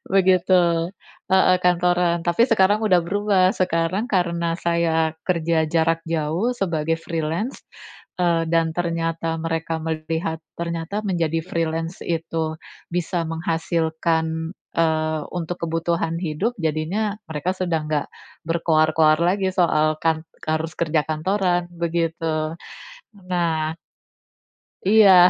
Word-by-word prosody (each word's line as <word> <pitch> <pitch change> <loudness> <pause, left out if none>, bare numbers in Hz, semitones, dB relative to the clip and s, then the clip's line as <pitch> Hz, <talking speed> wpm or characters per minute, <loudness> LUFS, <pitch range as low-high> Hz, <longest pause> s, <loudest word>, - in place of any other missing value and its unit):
Begitu 180 -2 +3 0.4
heeh 185 -1 +5
kantoran, 175 -1 +2
tapi 175 +7 +3
sekarang 205 -2 +4
sudah 185 -5 +5
berubah, 195 0 +2
sekarang 180 +3 0
karena 170 -2 +1
saya 165 -2 +1 0.2
kerja 165 -2 +1
jarak 165 0 +1
jauh 165 +7 0
sebagai 165 -8 -1
freelance, 165 - -3 0.6
eee, 170 -2 +2
dan 165 -1 +2
ternyata 165 -1 -1
mereka 165 0 -2
melihat 160 0 -2 0.2
ternyata 170 +4 -3
menjadi 165 -4 0
freelance, 165 -1 -2
itu 165 -1 -2 0.4
bisa 175 0 -1
menghasilkan, 160 0 -1 0.3
eee, 155 -1 +1
untuk 175 0 -3
kebutuhan 165 0 -1
hidup, 180 +8 -1
jadinya 165 +7 -1
mereka 160 +3 -1
sudah 175 -3 0
enggak 150 -2 -1 0.4
berkoar-koar 160 -2 +3
lagi 190 +2 +2
soal 155 -4 +3
kan 160 -1 +1 0.2
harus 155 +1 -1
kerja 160 -2 +2
kantoran, 175 +2 0
begitu. 165 -2 -1 0.8
Nah 160 -3 0 1.1
Iya. 195 -3 +7
165 Hz, 105 wpm, -22 LUFS, 160-180 Hz, 1.1 s, Iya